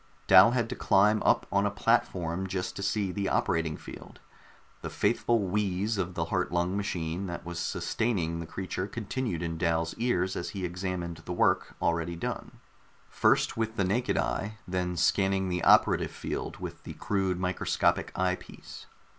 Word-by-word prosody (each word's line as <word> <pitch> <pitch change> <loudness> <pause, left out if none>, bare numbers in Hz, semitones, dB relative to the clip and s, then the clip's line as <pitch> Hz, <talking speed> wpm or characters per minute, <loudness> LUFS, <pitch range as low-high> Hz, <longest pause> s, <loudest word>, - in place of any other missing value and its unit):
Dal 95 +3 +8
had 120 -1 0
to - - -3
climb 105 +2 +3
up - - +3
on - - +2
a - - +1
platform 85 +2 0
just 95 -1 -3
to - - -5
see 100 -1 0
the 100 +1 -2
operating 80 -2 0
field; - - -11 0.6
the - - -5
faithful 115 -3 +1
wheeze 100 +2 0
of 90 -1 -2
the 80 - -1
heart 90 +2 -1
lung 90 +2 0
machine 90 -2 -2
that 85 -1 -6
was 85 0 -5
sustaining 85 -9 -1
the 85 - -6
creature 95 +2 -4
continued 110 -3 -3
in 85 -1 -3
Dal's 85 0 0
ears 95 -6 +1
as 85 -1 -3
he 95 - -2
examined 90 -1 -4
the 90 - -4
work - - +1
already 85 0 0
done, 85 - -5 0.5
first - - +2
with 110 0 -1
the 100 - +1
naked 110 +7 0
eye, 105 +1 -2
then 90 -1 -2
scanning 95 +1 +2
the 90 -1 -2
operative - - +5
field - - -5
with - - -7
the - - -8
crude 95 -3 -1
microscopic 90 0 0
eyepiece. 90 0 -4
95 Hz, 165 wpm, -29 LUFS, 85-100 Hz, 0.6 s, Dal